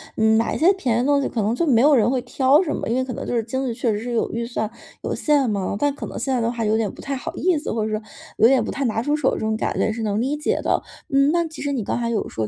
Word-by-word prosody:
嗯， 220 0 +3
买 225 - 0
一 - - -1
些 345 +4 +5
便 270 - 0
宜 - - +2
的 - - -1
东 285 0 +3
西 - - -1
可 230 - -2
能 210 +2 +1
就 330 +7 0
没 235 -5 +4
有 295 +3 +6
人 240 -4 +4
会 255 0 0
挑 265 +5 +3
什 300 - -2
么。 - - -4
因 230 - 0
为 260 - +1
可 260 - -5
能 - - -5
就 - - -1
是 230 - +1
经 260 +4 -3
济 240 - -2
确 235 0 0
实 205 - -1
是 240 +2 -5
有 230 - 0
预 230 +1 -3
算， 220 -3 -3 0.3
有 - - -2
限 290 -5 +2
嘛， 200 -2 -1
但 290 +4 +1
可 - - -7
能 - - -7
现 270 - -1
在 255 - +1
的 230 0 0
话 235 -1 -3
有 215 0 +2
点 220 -2 0
不 - - -11
太 275 - -4
好 260 - -5
意 360 -2 +1
思， 295 - -4
或 220 -1 -1
者 215 - -3
说 215 0 -2 0.4
有 225 - +6
点 265 0 +4
不 - - -4
太 275 - -2
拿 225 -1 0
出 295 +3 +1
手， 300 - +2
这 - - -3
种 220 0 -1
感 - - -2
觉 - - +1
也 - - 0
是 225 +1 -5
能 215 0 0
理 275 +4 -1
解 300 - -1
的。 - - +1 0.3
嗯， 275 +1 +4
那 340 0 +2
其 315 - -9
实 285 -1 -1
你 245 -5 -2
刚 220 - -2
才 235 -1 -1
有 230 -2 -1
说， 110 -1 -3
245 Hz, 380 characters per minute, -22 LUFS, 225-280 Hz, 0.4 s, 有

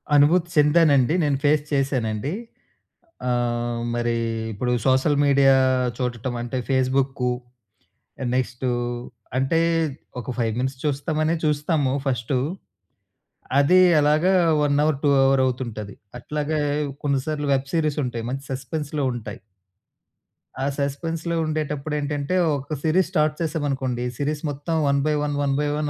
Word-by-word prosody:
అనుభూతి 165 +5 +4
చెందానండి. 150 -3 +4
నేను 145 -2 +1
ఫేస్ 145 0 +3
చేశానండి. 135 -2 -1 1.0
ఆహ్, 120 -1 -1
మరీ 120 0 0 0.4
ఇప్పుడు 125 +4 -2
సోషల్ 135 +3 +3
మీడియా 140 -1 +5 0.4
చూడటం 125 -1 -3
అంటే 120 +2 -3
ఫేస్బుక్కూ, 130 -1 +1 1.0
నెక్స్టూ 130 0 -1 0.7
అంటే 135 +6 +2 0.6
ఒక 125 - -5
5 115 -2 +1
మినిట్స్ 130 +1 -2
చూస్తామనే 155 +2 0
చూస్తాము 150 -2 +1
ఫస్టు. 125 0 0 1.2
అదీ 180 +6 +5 0.2
అలాగా 155 +5 +3 0.3
వన్ 145 -1 +2
అవర్, 155 -3 +1
2 145 - +4
అవర్ 135 0 +4
అవుతుంటది. 115 -5 -4 0.3
అట్లాగే 150 +4 -2 0.4
కొన్నిసార్లు 145 +1 -1
వెబ్ 135 0 -2
సీరీస్ 155 -3 +1
ఉంటాయి. 120 -2 -4
మంచి 135 +1 -4
సస్పెన్స్‌లో 145 +3 -3
ఉంటాయి. 110 -4 -7 1.3
ఆ - - +1
సస్పెన్స్‌లో 160 +4 -2
ఉండేటప్పుడు 150 -1 -2
ఏంటంటే, 145 +3 -2 0.2
ఒక 140 +2 -4
సిరీస్ 170 +3 +2
స్టార్ట్ 155 -4 +2
చేసాం 160 -2 -1
అనుకోండి. 130 -3 -2
సిరీస్ 145 +1 -2
మొత్తం 145 +4 -3
one 140 0 +2
by 155 - +2
one, 145 -1 -1
one 140 -1 +1
by 150 - 0
one 150 -1 -1
140 Hz, 125 wpm, -23 LUFS, 130-150 Hz, 1.3 s, మీడియా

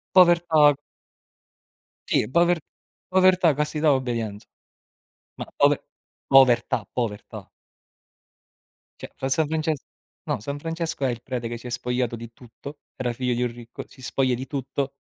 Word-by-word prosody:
Povertà. 170 -5 +6 1.3
Sì, - - +2
pover 170 +3 +3 0.5
povertà, 185 -3 +4
castità, 150 +1 +1
obbedienza. 115 -6 -2 0.9
Ma - - -4
pove - - +3 0.4
povertà, 135 -3 +4
povertà. 110 -5 -4 1.5
Cioè, - - -8
fra 135 - -3
San 150 +2 +2
Frances 155 -2 -1 0.5
no, - - -1
San 140 +7 -5
Francesco 165 -1 -3
è - - +1
il 120 -1 -5
prete 120 -2 -4
che 120 - -5
si 120 - -11
è - - -5
spogliato 125 0 -2
di 115 0 -9
tutto. 135 +5 -11 0.2
Era 125 -2 -2
figlio 125 0 -1
di 120 - -1
un 120 -1 -1
ricco, 120 0 -10
si 130 - -17
spoglia 130 0 0
di 130 +2 -5
tutto 140 -1 -3
130 Hz, 140 wpm, -24 LUFS, 120-155 Hz, 1.5 s, Povertà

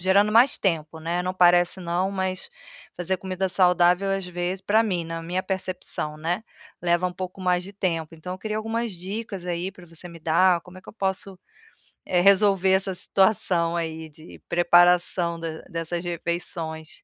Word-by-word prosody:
gerando 200 +3 +3
mais 240 +5 +5
tempo, 160 -4 -1
né. 170 +2 -1
Não 185 +1 -2
parece 175 0 +4
não, 175 +2 -1
mas 190 -1 -3 0.5
fazer 180 +2 -1
comida 190 0 -2
saudável, 180 +1 +3
às 195 -1 -1
vezes, 180 +1 -3
pra 210 +3 +3
mim, 185 -6 -1
na 165 0 -5
minha 180 +3 -2
percepção, 185 -5 -4
né, 170 +6 -2 0.4
leva 175 +1 +2
um 180 - -4
pouco 185 +1 -7
mais 180 -1 +1
de 195 +2 -9
tempo. 165 -5 -2
Então, 180 +3 -6
eu - - -11
queria 215 +1 -3
algumas 225 +2 -2
dicas 190 +1 -6
aí 175 +1 -2
pra 180 -2 -15
você 165 +1 -10
me 170 -1 -11
dar, 170 +2 +3
como 180 +1 -14
é - - -16
que - - -19
eu - - -9
posso, 195 -2 -2 0.7
eh, 180 -1 +2
resolver 195 0 +4
essa 190 0 +1
situação 180 -3 +2
aí 160 -1 -4
de 155 +2 -14
preparação 175 0 +4
da 165 -1 -5
dessas 170 0 -3
refeições. 165 -2 -4
180 Hz, 175 wpm, -24 LUFS, 170-190 Hz, 0.7 s, mais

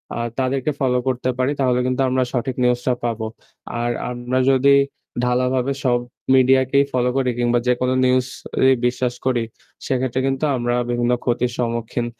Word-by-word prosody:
আ - - -4 0.2
তাদেরকে 135 +3 0
ফলো 125 -2 +2
করতে 130 0 -1
পারি 130 +2 +1
তাহলে 125 -2 +2
কিন্তু 130 +1 0
আমরা 130 0 +1
সঠিক 130 +1 -2
নিউজ 125 0 +2
টা 125 - +4
পাবো। 115 -2 -2 0.5
আর 120 0 0 0.2
আমরা 125 +1 -2
যদি 140 +1 +4 0.5
ঢালাভাবে 125 +2 +1
সব 120 -2 +2 0.4
মিডিয়াকেই 130 +1 +4
ফলো 125 0 +2
করি 130 -2 +1
কিংবা 120 0 +2
যেকোনো 125 +1 +1
নিউজ 130 0 +2 0.4
এই 130 - +5
বিশ্বাস 125 0 0
করি 120 -3 +1 0.4
সেক্ষেত্রে 130 -1 -1
কিন্তু 135 +3 0
আমরা 120 0 -1 0.2
বিভিন্ন 120 0 +1
ক্ষতির 120 0 0
সম্মুখীন 120 0 -2
125 Hz, 160 wpm, -21 LUFS, 120-130 Hz, 0.5 s, এই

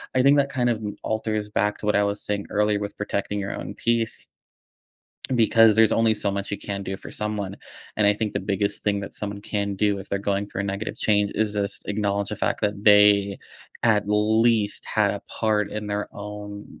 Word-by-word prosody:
I 130 - +4
think 140 +2 +6
that 140 -1 +2
kind 125 -3 0
of 120 - +1
m 105 -2 -5
alters 110 -1 -2
back 105 0 0
to - - -7
what 105 - +2
I 100 - +4
was 100 0 -1
saying 100 -1 -2
earlier, 105 0 +1
with 100 0 -6
protecting 105 0 -2
your 100 0 -3
own - - -6
peace, 115 -1 -1 1.1
because 115 -2 +5
there's 110 0 +5
only 115 -1 +3
so 105 -1 -1
much 100 0 -4
you - - 0
can 100 -1 -5
do 95 0 -4
for - - -11
someone, 105 -2 -3 0.4
and 105 - +3
I 105 - +5
think 105 0 -2
the - - -1
biggest 100 0 -2
thing 100 -1 +1
that 100 - -7
someone 100 -1 -5
can 100 -1 -2
do, 100 0 +1
if 95 - -9
they're 100 - -1
going 100 0 -1
through 100 - -5
a - - -1
negative 100 +2 -4
change, 105 -1 +2
is 105 -1 0
just 100 -1 -2
acknowledge 100 -1 -1
the 105 - -4
fact - - -1
that 105 -1 -2
they 105 -1 +6 0.4
at 105 -3 +3
least 110 +1 +2
had - - +2
a - - -5
part 105 -2 0
in 105 0 -4
their 105 0 -2
own 105 0 -8
105 Hz, 220 wpm, -24 LUFS, 100-110 Hz, 1.1 s, think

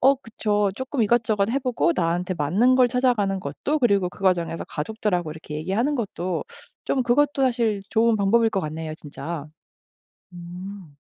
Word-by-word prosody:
어 270 +2 +6
그쵸 210 -5 -1
쪼끔 260 0 -2
이것저것 215 -2 +2
해 270 - +1
보고 250 -9 +1
나한테 175 +1 0
맞는 195 - +3
걸 250 -1 +5
찾아가는 240 -6 +1
것도 230 - -2
그리고 200 -6 +3
그 180 - -16
과정에서 175 -3 +1
가족들하고 180 -1 -2
이렇게 155 -1 -9
얘기하는 210 - 0
것도 185 -7 -3 0.4
좀 260 - +1
그것도 275 +3 +2
사실 230 -5 +1
좋은 225 0 +3
방법일 225 +3 +3
것 195 - 0
같네요 155 -1 -5
진짜. 155 0 -7 0.9
음. 180 -1 -9
205 Hz, 345 characters per minute, -24 LUFS, 175-240 Hz, 0.9 s, 어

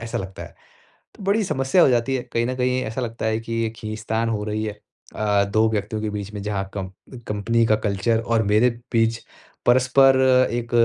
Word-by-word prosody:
ऐसा 115 0 -4
लगता 95 0 -7
है। - - -11 0.6
तो - - -11
बड़ी 205 +3 +2
समस्या 135 -1 +2
हो - - +6
जाती 125 +2 +1
है। 125 - -2
कहीं 115 0 +1
न 130 - -2
कहीं 125 0 0
ऐसा 115 +2 -4
लगता 115 -2 -4
है 110 0 0
कि 115 0 -6
ये 110 - 0
खींच-तान 110 +1 -3
हो 105 -2 -2
रही 105 +1 -2
है 105 -1 -5 0.4
आ, 105 -1 +2
2 110 +2 +2
व्यक्तियों 105 0 -2
के 110 - -2
बीच 105 0 -5
में 105 - -5
जहाँ 100 -2 -3
कम 95 -2 -4 0.4
कंपनी 115 +3 +1
का 110 - +3
कल्चर 105 +2 0
और 115 -1 +1
मेरे 105 +4 +3 0.2
बीच 115 -1 +1 0.4
परस्पर, 130 +2 +5 0.3
एक 120 0 -3
110 Hz, 205 wpm, -22 LUFS, 105-120 Hz, 0.6 s, हो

